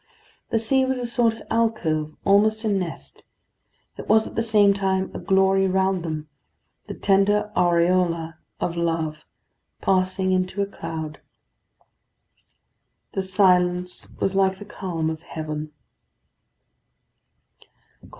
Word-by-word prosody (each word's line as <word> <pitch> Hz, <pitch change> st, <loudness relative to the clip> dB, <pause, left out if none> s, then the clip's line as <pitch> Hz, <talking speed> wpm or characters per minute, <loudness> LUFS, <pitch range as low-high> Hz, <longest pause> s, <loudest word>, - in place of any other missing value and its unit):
The 230 Hz, -, +1 dB
seat 260 Hz, +4 st, +2 dB
was 260 Hz, 0 st, -1 dB
a 245 Hz, -, -3 dB
sort 235 Hz, -1 st, +2 dB
of -, -, -12 dB
alcove, 165 Hz, -10 st, 0 dB
almost 215 Hz, +3 st, +3 dB
a -, -, +1 dB
nest; 190 Hz, -5 st, -4 dB, 0.8 s
it -, -, -7 dB
was 220 Hz, 0 st, +5 dB
at -, -, -8 dB
the -, -, 0 dB
same 210 Hz, -3 st, +4 dB
time 190 Hz, -1 st, -1 dB
a -, -, -5 dB
glory 195 Hz, 0 st, +3 dB
round 190 Hz, 0 st, +1 dB
them; 155 Hz, -2 st, -5 dB, 0.6 s
the -, -, -6 dB
tender 205 Hz, +1 st, +2 dB
aureola 170 Hz, -2 st, +1 dB, 0.2 s
of 170 Hz, -, -2 dB
love 165 Hz, -2 st, -1 dB, 0.6 s
passing 185 Hz, 0 st, +1 dB
into 185 Hz, +1 st, -1 dB
a -, -, -1 dB
cloud. 160 Hz, -5 st, -7 dB, 1.9 s
The 195 Hz, -, -2 dB
silence 180 Hz, -2 st, +2 dB
was 195 Hz, -, 0 dB
like 190 Hz, -1 st, +2 dB
the 205 Hz, -, -10 dB
calm 170 Hz, -5 st, -3 dB
of 160 Hz, 0 st, -7 dB
heaven. 155 Hz, -2 st, -6 dB
190 Hz, 120 wpm, -23 LUFS, 170-200 Hz, 1.9 s, was